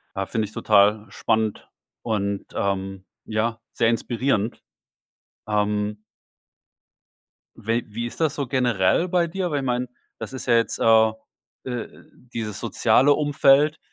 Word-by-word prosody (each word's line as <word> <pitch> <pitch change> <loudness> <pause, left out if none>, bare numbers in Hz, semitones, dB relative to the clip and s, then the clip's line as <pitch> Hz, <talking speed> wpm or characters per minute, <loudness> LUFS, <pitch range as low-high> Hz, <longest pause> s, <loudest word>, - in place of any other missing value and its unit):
Ja, 95 -1 -2
finde 110 -2 -1
ich 105 - -11
total 105 +1 +3
spannend 110 +1 -1 0.3
und, 100 -3 -2
ähm, 95 -1 -2 0.2
ja, 110 +1 -1
sehr 115 - +2
inspirierend. 115 -1 -1 0.9
Ähm 105 0 -1 1.5
wel 115 +3 -1
wie 115 +3 -4
ist - - -11
das 155 -3 +1
so 140 -2 -3
generell 120 - +2
bei 175 -1 +1
dir? 180 0 -3
Weil 145 - 0
ich 135 - -4
meine, 125 0 -1 0.3
das - - -7
ist 130 - -6
ja 120 - +4
jetzt, 115 0 +1
äh, 110 -1 +5 0.5
äh, 125 -3 -4 0.5
dieses 105 -3 -4
soziale 120 +4 +3
Umfeld 145 +1 +3
115 Hz, 135 wpm, -23 LUFS, 105-130 Hz, 1.5 s, äh